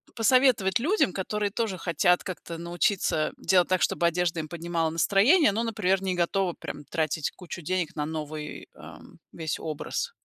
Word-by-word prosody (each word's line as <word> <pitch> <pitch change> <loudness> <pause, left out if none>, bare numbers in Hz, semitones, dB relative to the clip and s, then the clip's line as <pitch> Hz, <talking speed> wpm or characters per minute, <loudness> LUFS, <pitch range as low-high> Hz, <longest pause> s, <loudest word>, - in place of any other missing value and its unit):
посоветовать 230 -4 +3
людям, 315 - +2
которые 205 +2 -2
тоже 210 -4 -2
хотят 175 +1 +2
как-то 170 -2 -6
научиться 170 -1 0
делать 185 -2 +3
так, 185 -1 +2
чтобы 170 - +1
одежда 170 0 0
им 155 - -4
поднимала 170 0 -1
настроение, 205 - +4
но, 225 +3 -1
например, 195 -4 0
не 185 -1 0
готовы 175 +1 0
прям 145 - -8
тратить 155 -2 -1
кучу 175 -1 -9
денег 180 +1 -2
на 150 -1 -2
новый, 155 -1 -6
ам, - - -13
весь 160 -2 -4
образ? 155 -2 -4
180 Hz, 160 wpm, -27 LUFS, 165-200 Hz, -, настроение